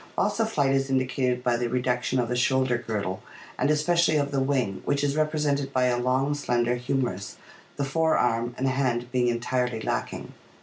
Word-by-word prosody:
Loss - - 0
of 225 -1 +2
flight 140 -8 +2
is 135 0 +1
indicated 130 -1 0
by 120 -1 +2
the 120 0 -1
reduction 125 +1 0
of 120 -2 +1
the 125 - -2
shoulder 130 0 +2
girdle, 105 -5 -3 0.4
and - - +2
especially 160 +2 +3
of 140 -1 0
the 140 - 0
wing, 130 -8 0
which 140 0 0
is 140 0 +1
represented 150 -3 0
by 130 -1 +2
a 125 -1 +2
long, 130 +3 +1
slender 120 -4 0
humerus, 125 -5 -2 0.4
the 140 - -1
fore 160 +3 +2
arm 120 0 0
and 135 - 0
hand 125 -2 0
being 125 -1 +2
entirely 120 0 -1
lacking. - - -4
130 Hz, 185 wpm, -26 LUFS, 120-140 Hz, 0.4 s, especially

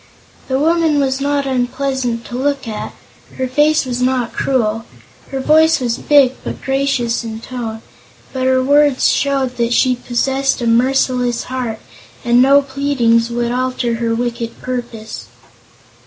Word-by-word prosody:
The 260 - 0
woman 320 0 +2
was 270 -1 0
not 285 0 0
unpleasant 255 -2 -2
to 240 - -7
look 275 0 -1
at; 215 -1 -5 0.4
her 260 - -1
face 295 +3 +2
was 250 -1 -3
not 250 -2 0
cruel; 225 -4 -1 0.4
her 270 - -4
voice 315 +4 +4
was 240 -3 -2
big 280 -3 +4
but - - -5
gracious 270 -4 0
in 220 -1 -6
tone; 230 -2 -6 0.5
but 260 -1 -1
her 260 0 +3
words 285 0 +3
showed 270 -3 0
that 235 0 0
she 255 +1 +3
possessed 265 +3 -1
a 240 - -3
merciless 245 0 +1
heart 250 -4 -4 0.5
and 240 +1 +4
no 280 +2 +5
pleadings 265 -4 +1
would 235 0 -2
alter 250 -2 -1
her 230 -1 -1
wicked 235 -1 -4
purpose. 240 -3 -6
255 Hz, 145 wpm, -17 LUFS, 235-275 Hz, 0.5 s, no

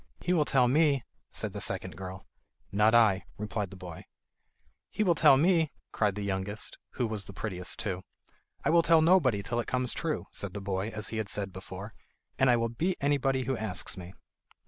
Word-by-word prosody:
"He 180 - 0
will 155 -4 +3
tell 130 -3 +3
me," 140 -1 +3 0.3
said - - -3
the - - -5
second - - -1
girl. 95 0 -8 0.5
"Not 105 +3 +4
I," 105 -5 +5
replied 105 -1 -3
the 95 - -11
boy. 90 -3 -9 0.8
"He 215 - 0
will 180 -4 +4
tell 135 -4 +6
me," 165 -1 +3 0.2
cried 105 -3 +1
the 105 - -4
youngest, 100 +1 -3
who 125 - 0
was 110 -3 -3
the 100 - -10
prettiest 90 -3 -3
too. 95 -4 -3 0.6
"I - - +3
will 170 0 +6
tell 165 -1 +5
nobody 145 - +4
till 120 +3 -2
it 120 - -3
comes 125 -1 0
true," 160 -3 -2
said 100 -1 -5
the - - -3
boy, 95 +1 -2
as 110 -2 -4
he 110 - -4
had 110 -2 -2
said 100 -2 -3
before; 95 +2 -8 0.5
"and 135 - +5
I 120 - +5
will 115 0 0
beat 170 +11 -1
anybody 135 -2 +1
who 130 +1 -1
asks 105 -6 -2
me." 90 0 -10
110 Hz, 200 wpm, -30 LUFS, 100-135 Hz, 0.8 s, tell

